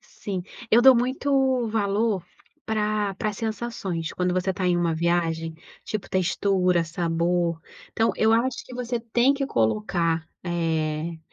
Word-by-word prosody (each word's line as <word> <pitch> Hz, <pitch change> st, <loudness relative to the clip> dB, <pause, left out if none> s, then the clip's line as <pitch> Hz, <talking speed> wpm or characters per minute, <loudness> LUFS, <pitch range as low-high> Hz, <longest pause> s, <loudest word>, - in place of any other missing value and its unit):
Sim. 190 Hz, -3 st, -6 dB, 0.3 s
Eu 235 Hz, +2 st, +6 dB
dou 265 Hz, 0 st, +9 dB
muito 260 Hz, 0 st, +1 dB
valor 210 Hz, -2 st, 0 dB, 0.4 s
pra 210 Hz, -2 st, 0 dB
pra 215 Hz, +2 st, -1 dB
sensações. 215 Hz, -6 st, -4 dB
Quando 180 Hz, 0 st, 0 dB
você 185 Hz, +1 st, 0 dB
tá 185 Hz, 0 st, -2 dB
em 180 Hz, -1 st, +3 dB
uma 170 Hz, -1 st, +1 dB
viagem. 165 Hz, -1 st, 0 dB, 0.3 s
Tipo 215 Hz, -2 st, -4 dB
textura, 185 Hz, -1 st, +1 dB
sabor. 170 Hz, 0 st, 0 dB, 0.3 s
Então, 225 Hz, +1 st, +2 dB
eu 220 Hz, 0 st, +3 dB
acho 240 Hz, +3 st, +1 dB
que 255 Hz, -, -11 dB
você 245 Hz, -1 st, -2 dB
tem 240 Hz, +4 st, +2 dB
que 275 Hz, -1 st, -2 dB
colocar, 165 Hz, -, 0 dB, 0.2 s
eh, 165 Hz, -1 st, -1 dB
190 Hz, 140 wpm, -25 LUFS, 170-225 Hz, 0.4 s, dou